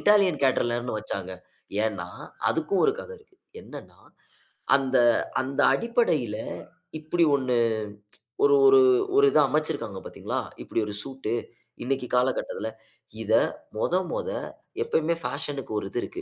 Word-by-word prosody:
Italian 200 -6 +4
கேட்டரலியர்னு 120 -2 +1
வச்சாங்க? 95 -3 -5 0.5
ஏன்னா, 100 -6 -2 0.4
அதுக்கும் 165 +4 0
ஒரு 415 - +4
கதை 475 - -9
இருக்கு. 405 -3 -26 0.2
என்னன்னா, - - -12 0.8
அந்த 135 -1 +2 0.4
அந்த 135 +1 -1
அடிப்படையில 155 - +1 0.6
இப்படி 165 +2 +1
1, 130 -3 0 0.9
ஒரு 425 0 +6
ஒரு 400 0 +7 0.3
ஒரு 420 +1 +6
இத - - +4
அமைச்சிருக்காங்க 145 -10 -1
பார்த்தீங்களா? - - -4 0.2
இப்படி 115 - -1
ஒரு 105 - -5
சூட் 135 -5 -5 0.5
இன்னைக்கு 130 0 -1
காலகட்டத்துல. 125 -3 0 0.5
இத 110 - 0 0.4
மொத 165 - 0 0.2
மொத 485 - -2 0.5
எப்பயுமே 170 - +1
பேஷனுக்கு 140 -5 -4
ஒரு 95 - -6
இது 120 - -2
இருக்கு. 370 - -6
135 Hz, 120 wpm, -26 LUFS, 120-185 Hz, 0.9 s, ஒரு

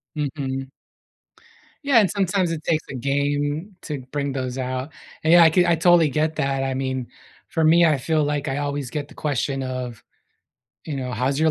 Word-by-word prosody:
Mhm. 135 -3 -3 1.1
Yeah, 275 -5 +5
and 200 - +3
sometimes 190 -2 0
it 160 -2 -4
takes 160 -1 0
a 135 - -6
game 145 - -1
to 150 -3 -4
bring 140 -1 -2
those 130 -1 -3
out. 130 +2 -3 0.3
And 160 - +3
yeah 175 -1 +9
I 160 - +6
c 175 +2 +4
I 170 -1 +3
totally 170 -1 +5
get 155 +3 0
that, 135 -2 0
I 135 - -1
mean, 130 -1 -2 0.4
for 160 - -1
me, 170 +2 +6
I 155 -3 +3
feel 155 +3 0
like 145 0 -1
I 135 0 -1
always 145 -2 -3
get 145 +2 -4
the - - -16
question 135 -2 -1
of, 130 -3 -5 0.8
you 150 - -3
know, 130 -2 -4
"How's 135 +4 0
your 160 0 +4
145 Hz, 195 wpm, -23 LUFS, 135-160 Hz, 1.1 s, yeah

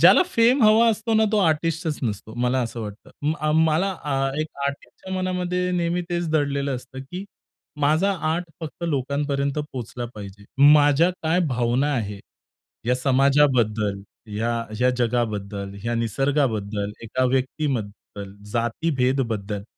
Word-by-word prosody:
ज्याला - - +8
फेम 245 -5 +3
हवा 220 +2 +6
असतो 220 +1 -1
ना 220 - +5
तो 215 - +3
आर्टिस्टच 165 -2 0
नसतो. 110 -2 -4
मला 125 +2 +1
असं 115 0 -5
वाटतं. 105 -1 -8
म 150 +2 +2
अ, 155 0 +1
मला 160 +4 +3
अ, 135 -2 0
एक 155 - -1 0.2
आर्टिस्टच्या 140 +6 -7
मनामध्ये 180 -1 -1
नेहमी 175 0 0
तेच 175 -1 -1
दडलेलं 140 -3 0
असतं 130 +2 -9
की 185 +2 -5 0.6
माझा 155 +7 +3 0.2
आर्ट 175 +2 -1 0.2
फक्त 160 +2 -6
लोकांपर्यंत 140 -1 -1
पोहोचला 125 -5 -5
पाहिजे. 100 -1 -10 0.3
माझ्या 150 +3 +5
काय 165 +3 +2
भावना 125 +3 +1
आहे, 105 -5 -3 0.7
या 125 - +3
समाजाबद्दल, 130 -7 +2 0.3
या 115 +2 0 0.3
या 125 0 +4
जगाबद्दल, 105 -5 -1
या 120 0 -1
निसर्गाबद्दल, 115 -4 0
एका 130 +3 0
व्यक्तीबद्दल, 125 -7 -2 0.2
जातीभेदबद्दल 120 -5 -1
135 Hz, 130 wpm, -23 LUFS, 115-160 Hz, 0.7 s, ज्याला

